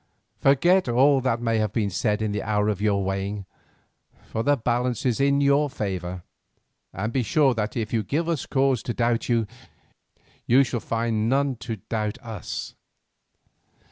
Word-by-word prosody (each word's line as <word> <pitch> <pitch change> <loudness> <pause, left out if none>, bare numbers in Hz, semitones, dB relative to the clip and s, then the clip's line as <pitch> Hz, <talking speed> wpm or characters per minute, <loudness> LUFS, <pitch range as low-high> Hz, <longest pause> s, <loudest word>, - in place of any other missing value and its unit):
Forget 175 +5 +4
all 135 +3 +4
that 120 -2 -1
may 115 -1 +1
have 105 -2 0
been 105 -3 0
said 105 +2 0
in 105 - -1
the 105 0 -2
hour 105 0 0
of 100 -2 -2
your 100 -2 +1
weighing, 95 +1 -3 0.8
for 110 - -4
the 145 +4 +2
balance 125 +1 -1
is 125 -2 +1
in 140 0 +3
your 140 +1 +3
favour, 90 -6 -4 0.7
and 110 +2 -4
be 130 - +2
sure 135 +4 +3
that 110 -1 -3
if 110 0 -3
you 115 - +2
give 150 - -2
us 165 -6 -2
no - - -17
cause 135 -2 +3
to 120 - -4
doubt 120 0 0
you, 115 -2 +2 1.0
you 130 +3 +6
shall 120 -2 -2
find 115 -1 -1
none 135 0 +1
to 110 +1 -5
doubt 105 -2 -2
us. 110 -6 -6
115 Hz, 170 wpm, -24 LUFS, 105-135 Hz, 1.0 s, you